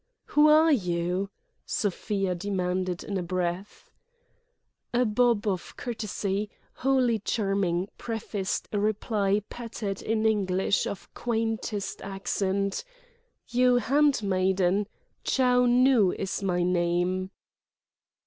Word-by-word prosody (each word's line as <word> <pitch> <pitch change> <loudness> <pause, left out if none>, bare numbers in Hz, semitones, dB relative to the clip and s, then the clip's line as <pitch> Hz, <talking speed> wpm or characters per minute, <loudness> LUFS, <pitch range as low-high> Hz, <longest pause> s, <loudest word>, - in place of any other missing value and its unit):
"Who 295 +1 +6
are 315 +1 +6
you?" 180 - 0 0.3
Sofia 195 -1 -1
demanded 185 -1 -2
in 200 -2 -3
a - - -2
breath. 180 +2 -4 1.0
A 250 +1 +4
bob 230 0 +2
of 185 -3 -3
courtesy, 210 -3 -3 0.2
wholly 255 -4 +2
charming, 195 -4 0
prefaced 215 -4 -3
a 205 - 0
reply 210 -1 0
pattered 220 -4 -5
in 220 0 0
English 195 -3 +1
of 200 - -7
quaintest 225 -3 -2
accent: 195 0 -2 0.6
"You' 250 +1 +3
handmaiden—Chou 215 0 +1
Nu 245 -5 +5
is 195 0 -3
my 180 -2 0
name." 180 +1 0
200 Hz, 95 wpm, -27 LUFS, 185-230 Hz, 1.0 s, Who